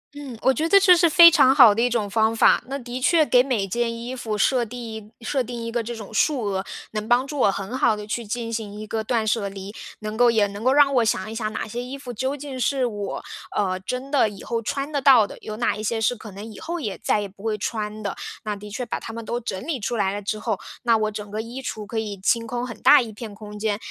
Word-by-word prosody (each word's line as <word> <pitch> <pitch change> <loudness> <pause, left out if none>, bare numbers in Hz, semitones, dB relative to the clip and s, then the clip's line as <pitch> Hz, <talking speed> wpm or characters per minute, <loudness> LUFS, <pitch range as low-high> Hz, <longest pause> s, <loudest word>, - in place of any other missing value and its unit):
嗯， 275 -5 -8
我 265 - +4
觉 315 +4 -1
得 395 - +7
这 375 -2 +7
是 340 -1 +4
非 335 +2 +10
常 290 -6 +5
好 245 -7 +8
的 230 - +1
一 245 - +3
种 225 -4 -1
方 220 +2 +2
法， 225 - +4
那 275 +2 -4
的 250 0 -6
确 315 +3 +4
给 250 -3 +5
每 235 -8 -1
件 230 +4 -1
衣 245 +2 -5
服， 220 -4 -3
设 250 +3 +2
地 220 -2 -8
设 255 +3 -1
定 235 0 -6
一 - - -3
个 235 0 -1
这 235 +2 -5
种 220 -1 -9
数 260 +2 +1
额， 190 -2 -1 0.3
能 215 0 -4
帮 245 +3 +3
助 295 0 -6
我 200 - +4
很 200 +6 -5
好 225 - +3
地 210 0 -8
去 235 +2 -3
进 230 +2 -4
行 210 -2 -5
一 215 - -7
个 220 0 -2
断 225 -1 0
舍 215 -2 0
离， 195 +1 -9 0.2
能 215 0 -5
够 240 +1 +5
也 215 -3 +3
能 200 +2 -8
够 255 - +4
让 280 0 +5
我 245 - +4
想 215 -2 0
一 220 - -7
想 215 -2 -2
哪 215 - -4
些 240 +3 -5
衣 260 +2 -7
服， 260 -3 -8
究 260 +5 -2
竟 275 -2 -7
是 255 +1 +1
我， 205 -4 -4 0.3
呃， 185 -2 0
真 255 +7 -5
的 275 -6 +3
以 200 -1 -11
后 230 -1 -2
穿 275 +5 -3
得 285 - 0
到 255 -6 +6
的， - - -11
有 215 0 -6
哪 235 - +1
一 210 - -6
些 225 +1 -1
是 225 +3 +1
可 215 -2 -11
能 200 +3 -9
以 - - -12
后 340 +2 -4
也 210 -10 -4
再 - - +1
也 205 - -3
不 195 +2 -17
会 220 -1 -1
穿 215 0 -4
的。 200 -2 -3 0.3
那 210 -1 -2
的 205 +1 -10
确 250 +4 -4
把 - - -4
它 - - -7
们 230 0 -7
都 240 +2 -3
整 190 -5 -4
理 320 -4 -1
出 235 +1 -3
来 195 -2 +1
了 205 - -4
之 210 +1 -3
后， 215 -2 -2 0.3
那 235 -2 +4
我 215 -1 0
整 210 -1 -7
个 215 +2 -3
衣 235 +4 -7
橱 220 -5 -5
可 225 +2 -3
以 210 -2 -4
清 230 +3 +1
空 245 +2 -3
很 240 - -9
大 295 - +7
一 230 -3 -6
片 215 -1 -9
空 210 0 -10
间。 210 -1 0
230 Hz, 300 characters per minute, -23 LUFS, 210-255 Hz, 0.3 s, 非